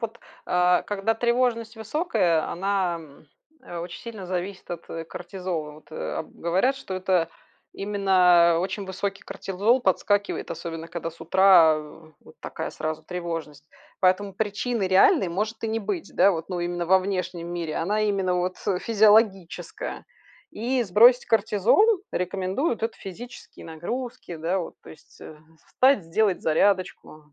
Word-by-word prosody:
вот, 230 0 -5 0.3
а, 180 0 +3
когда 205 +2 -1
тревожность 235 -1 0
высокая, 220 - 0
она 190 -2 -1 0.8
очень 175 +1 -7
сильно 220 -5 -8
зависит 185 +2 -5
от 170 -1 -6 0.2
кортизола. 175 -4 -5
Вот, 155 +2 -17
э, - - -4
об - - -6
говорят, 190 +11 +1
что 270 - -8
это 185 -3 +1 0.4
именно 185 -4 +4
очень 195 +2 -3
высокий 195 +1 -4
кортизол 195 +5 0
подскакивает, 205 0 0
особенно 165 -1 -6
когда 165 0 -5
с 165 - -19
утра, 175 -2 +6
э, 155 +1 -13
вот - - -17
такая - - -5
сразу 155 0 -4
тревожность. 165 -4 -6 0.3
Поэтому 190 +2 +2
причины 215 +1 -1
реальной 190 0 +4
может 210 +6 -3
и - - -1
не 220 +1 -1
быть, 200 -3 -4
да, 200 - +5
вот, 165 -3 -4
ну, 180 -1 -2
именно 175 0 -2
во 190 +2 +6
внешнем 180 -3 -3
мире, 165 -3 -4
она 205 +6 0
именно 195 -3 +1
вот, 180 +1 -1
э, 190 -2 +1
физиологическая. 215 - +1 0.5
И 245 +4 -1
сбросить 235 +5 +6
кортизол 230 - +3
рекомендуют- 190 - -2
это 225 0 -2
физические 215 +6 -10
нагрузки, 175 +4 -6
да, 165 +4 -1
вот. 175 - -6
То - - -13
есть, - - -17
э, 155 - -11 0.3
встать, 260 -7 +3
сделать 190 +3 +1
зарядочку, 160 -3 0
190 Hz, 145 wpm, -25 LUFS, 175-215 Hz, 0.8 s, утра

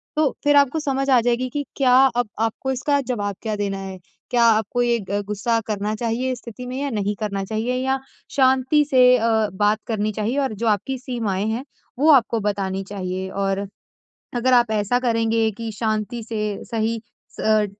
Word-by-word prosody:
तो 305 -2 +3
फिर 290 0 +4
आपको 285 +2 +4
समझ 275 -2 -1
आ 255 -2 +6
जाएगी 245 +2 0
कि 290 +1 -3
क्या 255 -3 +4 0.2
अब 245 -3 0
आपको 225 +4 -1
इसका 280 +2 +1
जवाब 205 -7 -3
क्या 220 -2 -2
देना 200 -1 -2
है। 190 -1 -7 0.3
क्या 240 -1 +3
आपको 220 +2 +2
ये 235 -1 +2
ग 205 0 0
गुस्सा 220 +3 0
करना 210 0 -2
चाहिए 240 +3 -1
इस 245 - -7
स्थिति 245 +1 -9
में 255 - -5
या 285 - -1
नहीं 205 -1 -1
करना 200 -2 -2
चाहिए, 220 +4 -2
या 265 0 +1 0.4
शांति 265 +2 +4
से 250 -1 +6
अ, 220 -2 +2
बात 210 +2 +2
करनी 215 -1 -1
चाहिए 220 +6 -2
और 265 -5 -1
जो 225 +3 -3
आपकी 220 +6 0
सीमाएँ 225 -6 -2
हैं, 240 +5 -3 0.3
वो 310 +2 +4
आपको 235 -4 +4
बतानी 195 -1 -2
चाहिए। 190 -1 -4
और 195 0 -2 0.7
अगर 250 +2 +2
आप 240 -2 +4
ऐसा 215 +3 +1
करेंगे 225 -2 +1
कि 230 -1 -4
शांति 220 +1 -2
से 210 -2 -3
सही 225 0 -1 0.4
स - - -5
अ, 215 -1 +3
230 Hz, 190 wpm, -22 LUFS, 210-255 Hz, 0.7 s, आ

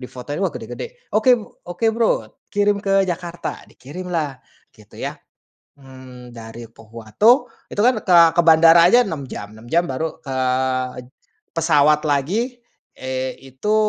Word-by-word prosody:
Difotoin, 130 +4 -7
wah 190 - +2
gede-gede. - - -8
"Oke 245 +3 +5
b - - -9 0.3
oke 175 +6 -2
Bro, 230 -1 +2 0.4
kirim 205 0 +1
ke 195 -1 +2
Jakarta." 175 0 -5
Dikirimlah, 155 -1 -5 0.4
gitu - - -19
ya. - - -4 0.6
Mmm, 130 -2 -13
dari 115 0 -10
Pohuwato. 115 - +1 0.2
Itu 205 - -2
kan 250 -3 +3
ke 180 -3 +5 0.2
ke - - +6
bandara 165 +1 +7
aja 240 +5 +6
6 150 -7 -5
jam. 100 - -7
6 110 - -14
jam 170 +1 +3
baru 160 +4 -4
ke 135 -2 -6 1.2
pesawat 150 -2 +3
lagi, 210 - -1 0.4
eee, 130 0 -4 0.2
itu 210 +11 -1
165 Hz, 140 wpm, -20 LUFS, 130-205 Hz, 1.2 s, bandara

